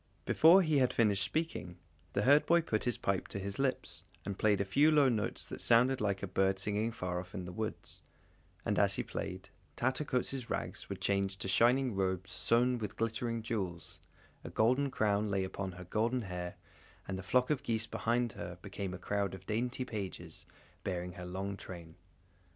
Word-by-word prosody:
Before 175 Hz, +4 st, +7 dB
he 155 Hz, -4 st, +3 dB
had 130 Hz, -1 st, +3 dB
finished 105 Hz, -3 st, +3 dB
speaking, 130 Hz, -, -2 dB, 0.4 s
the 100 Hz, -, +1 dB
herdboy 150 Hz, +6 st, +5 dB
put 110 Hz, -7 st, 0 dB
his 120 Hz, -2 st, +1 dB
pipe 100 Hz, -2 st, -1 dB
to -, -, -5 dB
his 100 Hz, +3 st, -4 dB
lips 135 Hz, -1 st, -1 dB, 0.2 s
and 100 Hz, -, -3 dB
played 105 Hz, -2 st, +3 dB
a 100 Hz, -, +1 dB
few 140 Hz, +11 st, +4 dB
low 145 Hz, -3 st, +5 dB
notes 110 Hz, -4 st, -1 dB
that -, -, -2 dB
sounded 125 Hz, +2 st, +5 dB
like 100 Hz, -2 st, 0 dB
a -, -, -1 dB
bird 95 Hz, +1 st, +2 dB
singing 105 Hz, +3 st, 0 dB
far 90 Hz, -5 st, -3 dB
off 90 Hz, +1 st, -9 dB
in 90 Hz, -3 st, -4 dB
the 90 Hz, -, -6 dB
woods; 110 Hz, +3 st, -5 dB, 0.6 s
and -, -, +1 dB
as -, -, +3 dB
he -, -, -1 dB
played, -, -, -5 dB, 0.3 s
Tattercoats' 130 Hz, -1 st, -1 dB
rags -, -, -4 dB
were -, -, -2 dB
changed 100 Hz, -1 st, 0 dB
to -, -, -2 dB
shining 120 Hz, +6 st, +4 dB
robes 95 Hz, 0 st, -1 dB
sewn 120 Hz, +1 st, +2 dB
with 105 Hz, -, -5 dB
glittering 115 Hz, 0 st, -1 dB
jewels, 95 Hz, -7 st, -4 dB, 0.4 s
a -, -, -6 dB
golden 130 Hz, +5 st, +2 dB
crown 105 Hz, -3 st, +1 dB
lay 95 Hz, -1 st, +1 dB
upon 95 Hz, 0 st, -4 dB
her 90 Hz, +1 st, -9 dB
golden 115 Hz, +7 st, 0 dB
hair, 90 Hz, -2 st, -5 dB, 0.5 s
and 95 Hz, -, -3 dB
the 95 Hz, -, -4 dB
flock 125 Hz, -, +2 dB
of 150 Hz, -, +1 dB
geese 110 Hz, -1 st, -1 dB
behind 120 Hz, +1 st, 0 dB
her, 90 Hz, -3 st, -7 dB
became 100 Hz, -2 st, -4 dB
a -, -, -6 dB
crowd 100 Hz, +1 st, -1 dB
of 95 Hz, 0 st, -13 dB
dainty 125 Hz, +4 st, -1 dB
pages, 95 Hz, -7 st, -5 dB, 0.4 s
bearing 90 Hz, -1 st, -3 dB
her 90 Hz, -1 st, -8 dB
long 95 Hz, +2 st, -3 dB
train. 85 Hz, -4 st, -9 dB
105 Hz, 185 wpm, -33 LUFS, 95-125 Hz, 0.6 s, Before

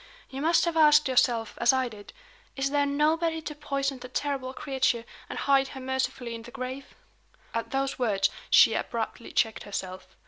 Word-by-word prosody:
You 270 Hz, +1 st, -5 dB
must 330 Hz, +3 st, +3 dB
have 340 Hz, -1 st, -1 dB
asked 300 Hz, -2 st, +6 dB
yourself, 240 Hz, -4 st, +2 dB
as 235 Hz, -, +6 dB
I 260 Hz, -1 st, +1 dB
did: 210 Hz, -3 st, -11 dB, 0.4 s
'Is 275 Hz, 0 st, -1 dB
there 285 Hz, 0 st, +2 dB
nobody 320 Hz, +3 st, +1 dB
to 300 Hz, -, -5 dB
poison 275 Hz, -2 st, -2 dB
the 250 Hz, -, -8 dB
terrible 265 Hz, 0 st, -3 dB
creature, 260 Hz, -4 st, -1 dB, 0.2 s
and -, -, -5 dB
hide 275 Hz, -1 st, +3 dB
her -, -, -5 dB
mercifully 260 Hz, -2 st, -2 dB
in 230 Hz, -, -7 dB
the 235 Hz, -, -11 dB
grave?'" 260 Hz, +1 st, -7 dB, 0.6 s
At 230 Hz, 0 st, -2 dB
those 270 Hz, 0 st, -2 dB
words, 195 Hz, -5 st, +2 dB, 0.2 s
she 225 Hz, -, +7 dB
abruptly 230 Hz, +1 st, -4 dB
checked 225 Hz, -1 st, +1 dB
herself. 185 Hz, -2 st, -6 dB
265 Hz, 175 wpm, -27 LUFS, 235-280 Hz, 0.6 s, she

